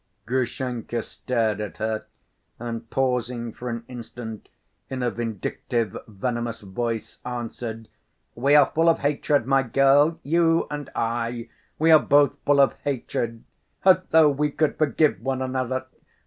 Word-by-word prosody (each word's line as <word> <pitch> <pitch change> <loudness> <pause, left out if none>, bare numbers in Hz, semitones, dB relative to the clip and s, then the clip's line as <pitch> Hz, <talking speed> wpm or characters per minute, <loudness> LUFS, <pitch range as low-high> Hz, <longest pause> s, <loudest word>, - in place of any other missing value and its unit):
Grushenka 125 -1 -2
stared 110 -4 -1
at 105 - -6
her 110 0 -2 0.5
and, 115 -1 -6
pausing 125 -3 -1
for 125 - -6
an 115 0 -4
instant, 115 -2 -8 0.4
in 130 -1 -3
a 120 - +1
vindictive, 115 -1 -3
venomous 120 +2 -3
voice, 115 +3 -4
answered: 115 -2 -5 0.5
"We 140 +5 +3
are 150 - +6
full 165 +1 +4
of 165 - +4
hatred, 145 -2 +1
my 135 +1 +3
girl, 135 +5 +4
you 165 +2 +3
and 145 -1 -5
I! 115 0 -2 0.3
We 160 +1 +4
are 155 - +9
both 145 -2 +3
full 145 0 +4
of 140 - +5
hatred! 120 -4 -3 0.4
As 185 -1 +7
though 160 -2 +5
we 150 +2 0
could 150 0 0
forgive 155 - +2
one 130 +1 -1
another! 130 0 -2
125 Hz, 140 wpm, -24 LUFS, 115-140 Hz, 0.5 s, are